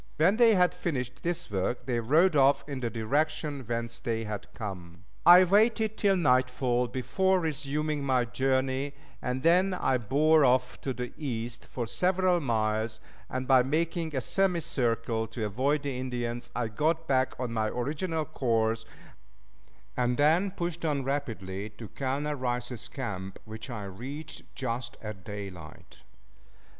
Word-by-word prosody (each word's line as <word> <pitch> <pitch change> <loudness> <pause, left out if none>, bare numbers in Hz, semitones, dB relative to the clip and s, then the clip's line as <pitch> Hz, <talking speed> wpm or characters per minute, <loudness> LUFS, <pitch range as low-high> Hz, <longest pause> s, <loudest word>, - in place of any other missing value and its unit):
When 180 +7 +4
they 230 -3 +6
had 180 -1 +4
finished 130 -5 -3
this 175 -5 -2
work 100 +5 -1
they 120 -3 0
rode 155 +9 +4
off 140 0 +4
in 140 -3 -4
the 120 -2 -1
direction 145 +6 -1
whence 115 0 -3
they 115 -1 -2
had 105 -2 -6
come. 90 -5 -7 0.2
I 180 +1 +10
waited 220 +3 +3
till 200 -3 +3
nightfall 125 -5 +2
before 160 - +1
resuming 150 -1 -1
my 130 -3 +2
journey, 130 +2 0 0.3
and 125 +2 -2
then 185 +3 +4
I 130 -7 +1
bore 150 +7 +4
off 125 -1 +2
to 135 - -2
the 125 -1 -5
east 120 -4 -4
for 120 - -4
several 180 +6 +2
miles, 110 -4 0 0.3
and 130 0 -3
by 130 -2 +6
making 160 +3 -1
a 130 - 0
semicircle 120 - 0
to 115 0 -4
avoid 135 +8 0
the 140 -2 -2
Indians, 120 -2 -3
I 120 -2 0
got 160 +8 0
back 130 -2 +1
on 125 -2 -3
my 110 -1 +1
original 155 +7 -2
course, 115 -4 0 1.1
and 125 -1 +1
then 160 +7 +4
pushed 175 -2 -4
on 145 -4 0
rapidly 110 -8 -3
to 115 - -8
Colonel 140 +3 -2
Rice's 125 -2 -3
camp, 95 -8 -5
which 110 +3 -8
I 115 -4 -5
reached 125 +11 -7
just 120 -2 -3
at 105 -3 -7
daylight. 95 -6 -9
130 Hz, 150 wpm, -29 LUFS, 115-155 Hz, 1.1 s, I